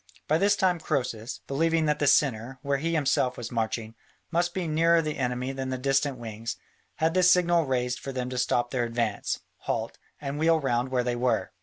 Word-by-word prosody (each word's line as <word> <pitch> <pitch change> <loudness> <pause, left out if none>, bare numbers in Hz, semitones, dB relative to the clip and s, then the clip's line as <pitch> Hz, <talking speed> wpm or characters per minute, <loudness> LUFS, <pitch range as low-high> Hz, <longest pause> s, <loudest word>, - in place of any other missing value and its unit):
By 155 +2 +3
this 200 +2 +4
time 185 -3 +2
Croesus, 125 -7 -3
believing 165 +3 +1
that 150 0 +1
the 145 - +1
centre, 130 -2 +2
where 140 -1 0
he 165 +3 -1
himself 135 -4 +1
was 120 0 -6
marching, 115 -1 -2 0.4
must 175 +1 +1
be 180 -3 -1
nearer 165 +2 +4
the 155 -3 -2
enemy 125 0 -1
than 135 -1 -4
the 130 - -2
distant 135 +1 +1
wings, 115 -1 -5 0.4
had 160 +1 +1
the 185 - +3
signal 175 -3 +4
raised 125 -1 0
for 135 - -6
them 130 -1 -3
to 125 - -2
stop 120 -1 +1
their 125 -2 0
advance, 115 -3 -2 0.2
halt, - - -3 0.2
and 140 0 -4
wheel 165 +1 +4
round 125 -3 0
where 125 -1 +1
they 120 0 -1
were. 125 +1 0
135 Hz, 200 wpm, -27 LUFS, 125-160 Hz, 0.4 s, this